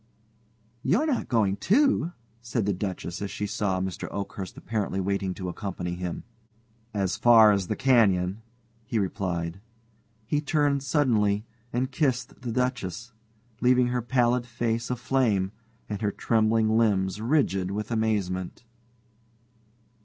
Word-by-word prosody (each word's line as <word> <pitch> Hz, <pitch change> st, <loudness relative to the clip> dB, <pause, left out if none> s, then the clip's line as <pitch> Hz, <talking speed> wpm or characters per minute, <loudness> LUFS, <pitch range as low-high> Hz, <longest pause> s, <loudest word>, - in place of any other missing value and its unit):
"You 185 Hz, -, +2 dB
are -, -, +1 dB
not 285 Hz, -6 st, 0 dB
going, 105 Hz, -4 st, +2 dB
too?" 210 Hz, -, +2 dB, 0.3 s
said 115 Hz, -3 st, -2 dB
the 100 Hz, -, +1 dB
Duchess 90 Hz, -1 st, -4 dB
as 100 Hz, -, -3 dB
she 105 Hz, -, -3 dB
saw 100 Hz, -2 st, -1 dB
Mr. 95 Hz, -1 st, -4 dB
Oakhurst 100 Hz, -2 st, -6 dB
apparently 105 Hz, -3 st, -2 dB
waiting 95 Hz, -1 st, -1 dB
to 95 Hz, -, -5 dB
accompany 90 Hz, -1 st, -4 dB
him. 90 Hz, -1 st, -4 dB, 0.7 s
"As 100 Hz, -4 st, -1 dB
far 115 Hz, -3 st, +7 dB
as 100 Hz, -3 st, 0 dB
the -, -, -1 dB
canyon," 100 Hz, -6 st, +3 dB, 0.4 s
he 110 Hz, +1 st, -3 dB
replied. 90 Hz, -3 st, -2 dB, 0.6 s
He 145 Hz, +6 st, 0 dB
turned 145 Hz, -2 st, +1 dB
suddenly, 115 Hz, -7 st, +2 dB, 0.3 s
and 130 Hz, +2 st, -1 dB
kissed 130 Hz, -5 st, -1 dB
the 125 Hz, -2 st, -4 dB
Duchess, 120 Hz, -2 st, -2 dB, 0.5 s
leaving 125 Hz, 0 st, +4 dB
her 125 Hz, 0 st, 0 dB
pallid 120 Hz, 0 st, +1 dB
face 115 Hz, -1 st, -2 dB
aflame 120 Hz, -6 st, +1 dB, 0.4 s
and 105 Hz, -2 st, -4 dB
her 105 Hz, -2 st, +1 dB
trembling 110 Hz, 0 st, +2 dB
limbs 100 Hz, -3 st, +1 dB
rigid 110 Hz, -8 st, +1 dB
with 105 Hz, +3 st, -4 dB
amazement. 105 Hz, -4 st, -1 dB
110 Hz, 130 wpm, -27 LUFS, 95-125 Hz, 0.7 s, far